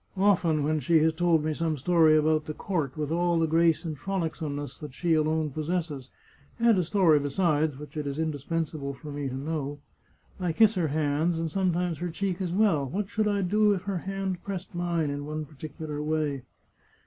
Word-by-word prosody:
Often, 175 -6 +3
when 155 +1 +1
she 160 +5 +3
has 160 0 +3
told 165 -2 +2
me 155 - 0
some 160 -1 -1
story 160 +1 +4
about 155 0 +2
the 155 - -5
court, 160 -8 -2
with 150 0 -2
all 175 0 +2
the 165 - +3
grace 165 +1 +2
and 160 -2 -3
frolicsomeness 155 -4 -4
that 150 -4 -9
she 170 -2 +1
alone 155 -1 +1
pos 155 +3 -4
sesses— 155 -7 -2 0.5
^and 230 -1 +5
a - - +2
story, 170 -3 +4
besides, 150 0 +1
which 150 +2 -10
it 150 -2 -3
is 140 0 -3
indispensable 155 -2 -2
for 150 +2 -9
me 145 -1 -3
to 130 - -5
know 145 0 -3 0.3
— - - -31
I 180 -3 -1
kiss 220 +5 +5
her 180 -5 0
hands 155 +3 0
and 165 -1 -2
sometimes 180 -2 0
her 175 +1 -2
cheek 190 +2 -2
as 180 -2 -2
well. 175 -9 +2
What 195 +6 -3
should 215 -1 0
I 200 -1 +1
do 210 +2 +3
if 185 - -5
her 195 -2 -2
hand 195 -1 -3
pressed 190 -2 -6
mine 170 -4 -1
in 145 0 -4
one 155 0 -4
particu 155 +2 -9
lar 150 -1 -3
way 150 -3 -1
160 Hz, 205 wpm, -27 LUFS, 150-180 Hz, 0.5 s, ^and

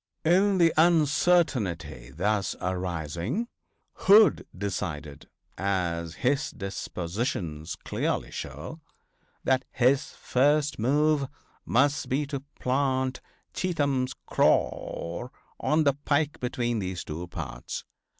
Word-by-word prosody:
In 190 +4 +4
the 170 -2 +5
uncertainty 140 - +2
thus 95 +6 0
arising 90 - -2 0.5
Hood 210 +2 +5
decided, 80 -7 -4 0.3
as 85 -4 -1
his 140 +3 +1
dispositions 90 - -4
clearly - - -2
show, - - -7 0.6
that 130 0 +2
his 130 +4 +2
first 145 +2 +2
move 145 +4 +2 0.4
must 140 +4 +2
be 140 +3 +1
to 140 -1 -4 0.2
plant 130 0 0 0.3
Cheatham's 140 -8 0
corps 85 +10 0 0.3
on 155 +1 +2
the 140 -2 +4
pike 145 +1 0
between 120 -2 -1
those 95 -2 -3
two 80 +3 -6
parts. - - -6
125 Hz, 95 wpm, -27 LUFS, 90-145 Hz, 0.6 s, the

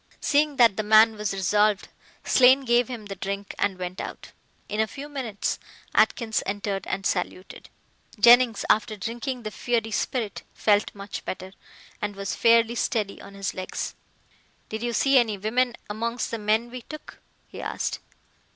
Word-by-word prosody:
Seeing 295 0 +2
that 235 -6 +5
the - - +1
man 215 +1 +6
was 210 -1 -2
resolved, 205 +2 +2 0.4
Slane 260 +1 +6
gave 240 -1 +3
him 235 -4 -7
the 200 -1 -6
drink 200 +1 -5
and 195 -2 0
went 180 0 -5
out. - - -8 0.4
In 210 - -4
a 220 - +2
few 280 +6 -8
minutes 255 -8 -3 0.3
Atkins 225 -4 +2
entered 200 0 -3
and 195 +1 -3
saluted. 185 0 -3 0.5
Jennings, 240 -2 +6
after 215 0 +2
drinking 240 +4 -4
the 215 - -5
fiery 225 +1 -1
spirit, 225 -1 -2
felt 210 -1 +2
much 200 0 -7
better, 185 +1 -6 0.5
and 205 -1 -3
was 195 0 -4
fairly 230 0 +4
steady 215 -4 -2
on 200 0 -12
his 195 -1 -3
legs. 185 0 -4 0.8
"Did 220 0 -5
you 240 0 -1
see 275 +2 +4
any 220 -4 0
women 235 +4 0
amongst 230 +3 -3
the 230 - -3
men 220 +3 +1
we 250 0 -7
took?" 305 +5 -11 0.3
he - - -9
asked. - - -3
220 Hz, 160 wpm, -25 LUFS, 200-240 Hz, 0.8 s, man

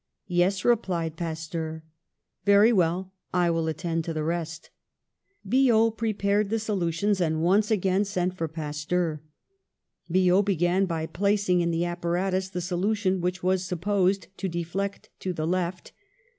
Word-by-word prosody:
" - - -57
'Yes,' 180 +2 +1
replied 180 -9 +1
Pasteur. 160 -1 -4 0.3
" - - -56
'Very 205 +3 +6
well, 185 0 +1 0.2
I 175 -1 +3
will 165 -1 0
attend 165 +1 -2
to 165 - -4
the 155 - -1
rest.' 165 0 -4 0.8
"Biot 230 -2 +4
prepared 210 -2 0
the 225 - +1
solutions, 200 -2 0
and 160 -1 0
once 200 +4 +3
again 195 -2 +2
sent 185 -2 -1
for 165 -3 -2
Pasteur. 155 +1 -2 0.9
Biot 185 +2 +4
began 185 0 +1
by 165 -2 -2
placing 200 0 +1
in 170 - +1
the 170 +1 0
apparatus 180 +2 -1
the 180 -2 -4
solution 190 +1 0
which 180 +1 -2
was 185 0 +2
supposed 190 +1 0
to 190 - -2
deflect 175 +4 -4
to 185 - -3
the 155 -2 -3
left. 180 +1 -2
180 Hz, 145 wpm, -26 LUFS, 165-200 Hz, 0.9 s, Very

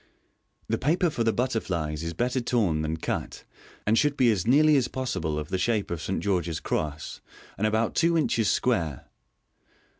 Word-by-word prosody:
The - - -1
paper 170 +4 +2
for 120 - -1
the 115 - +3
butterflies 90 - -2
is 85 0 -4
better 125 +5 0
torn 105 -10 +1
than 80 +1 -2
cut, - - -4 0.4
and 110 - +3
should 145 -1 +1
be 125 -3 +5
as 100 -2 -1
nearly 150 +4 +5
as 130 -3 +2
possible 85 -13 -3
of 75 0 -4
the 95 - -1
shape 105 0 0
of 85 - -2
a - - -9
St. 95 - -2
George's 85 -5 -1
cross, 75 0 -3 0.3
and 105 - 0
about 110 +1 0
two 170 0 +2
inches 115 -9 +1
square. 85 - 0
110 Hz, 180 wpm, -26 LUFS, 85-125 Hz, 0.4 s, be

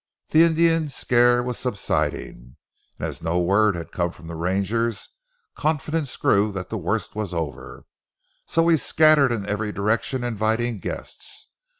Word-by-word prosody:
The 155 - +5
Indian 165 -1 +3
scare 120 -2 +3
was 125 -1 -4
subsiding, 100 - -3 0.4
and - - -4
as - - -7
no 80 +2 -1
word 100 +3 +3
had 85 -1 -7
come 85 -1 -1
from 85 0 -14
the 85 - -7
rangers 100 +6 -1 0.5
confidence 155 -2 -1
grew 105 +1 +2
that 95 -2 -6
the 110 - -2
worst 95 +3 -2
was 105 -4 -4
over, 80 -3 -5 0.6
so 165 - +2
we 165 -1 +4
scattered 155 -3 +4
in 110 -4 -2
every 105 +1 -2
direction 115 +5 -1
inviting 115 0 -1
guests. - - -7
110 Hz, 150 wpm, -23 LUFS, 95-130 Hz, 0.6 s, The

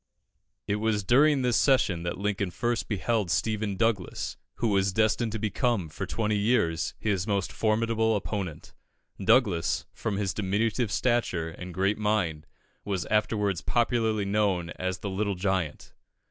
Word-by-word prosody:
It 100 - 0
was 105 -1 0
during 135 +6 +4
this 125 -2 +2
session 115 - +3
that 85 0 -3
Lincoln 100 -1 -1
first 120 +6 -1
beheld 105 -1 0
Stephen 105 +3 0
Douglas, 110 -5 -1 0.2
who 115 - 0
was 100 -1 +2
destined 110 +3 +1
to - - -1
become, 110 - 0
for 90 +5 -5
twenty 105 +1 0
years, 100 -7 +1
his 100 -3 -1
most 100 -3 0
formidable 110 0 +1
opponent. 90 -4 -4 0.5
Douglas, 90 -10 +3
from 105 -3 -3
his 100 -2 -1
diminutive 105 +3 0
stature 115 -11 0
and 90 +2 -8
great 95 +4 0
mind, 95 -8 0 0.4
was 95 -4 -2
afterwards 105 -3 +1
popularly 115 -3 +1
known 100 -4 0
as 95 0 -3
the 100 - -5
Little 100 +1 -1
Giant. 90 -4 -2
105 Hz, 145 wpm, -27 LUFS, 95-110 Hz, 0.5 s, during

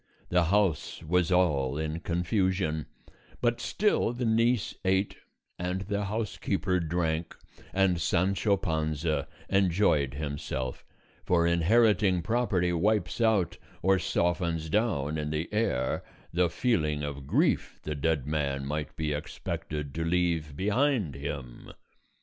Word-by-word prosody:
The 90 -1 +3
house 90 -3 +1
was 90 +2 +1
all 75 -7 +2
in 80 +1 -2
confusion; 90 -2 0 0.5
but 120 -1 +1
still 205 - +1
the 125 0 -2
niece 115 0 +2
ate 95 +1 +1 0.4
and 90 +2 -2
the 100 +1 -2
housekeeper 100 -3 -1
drank 85 0 -1 0.3
and 95 -3 +2
Sancho 100 +4 +2
Panza 80 -4 -1 0.2
enjoyed 90 -8 +2
himself; 70 -3 -4 0.4
for 85 -2 +3
inheriting 95 +2 +3
property 100 -5 +1
wipes 100 +3 +1
out 110 -6 +2 0.2
or 95 +1 +4
softens 85 -2 0
down 80 -9 +1
in 75 0 -2
the 75 +2 -2
heir 65 - 0 0.3
the 90 0 +3
feeling 80 -8 0
of 70 -2 -5
grief - - +1
the 75 - -3
dead 75 -1 0
man 70 -3 -1
might 75 +1 -3
be 80 -2 -1
expected 75 -1 -5
to 80 - -2
leave 85 -3 0
behind 105 - +1
him. 70 -3 -7
85 Hz, 120 wpm, -29 LUFS, 75-100 Hz, 0.5 s, or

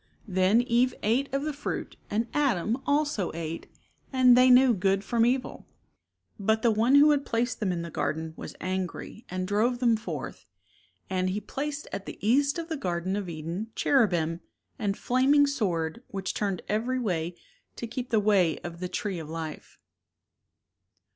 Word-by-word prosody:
Then 190 +4 +3
Eve 245 +1 +2
ate 250 +7 +1
of 275 +1 -1
the 305 0 -2
fruit 285 - -5
and 220 +3 0
Adam 245 -4 +1
also 285 - +1
ate 165 0 -5 0.4
and 255 -2 +6
they 255 +1 +6
knew 255 0 +7
good 195 0 +1
from 230 +2 +2
evil. 255 +1 -2 0.7
But 220 +2 +1
The 235 - +5
One 230 +5 +3
who 295 +1 +7
had 285 -1 +2
placed 240 0 -1
them 205 -4 0
in 170 -1 -3
the 170 - -7
garden 160 +2 -2
was - - -8
angry 185 +4 -4
and 185 0 -3
drove 220 +5 +1
them 240 -2 +3
forth, 220 +2 -6 0.6
and 185 -1 0
"He 195 +3 -1
placed 285 +7 -5
at 195 - -5
the - - -7
east 280 - +2
of 335 -1 -4
the 320 -2 -3
garden 185 -3 -2
of 200 -3 -3
Eden 170 +6 -5
cherubim 175 - +2 0.4
and 200 -3 0
a - - -17
flaming 270 +4 +4
sword 195 - -1
which 195 -1 -4
turned 195 -4 -2
every 235 +5 0
way 175 -8 -2 0.4
to - - -5
keep 245 +2 -5
the 220 - +3
way 200 -6 +3
of 170 -1 -7
the 180 0 -4
tree 200 -5 -3
of 155 -2 -8
life." 160 -1 -7
215 Hz, 175 wpm, -27 LUFS, 185-255 Hz, 0.7 s, knew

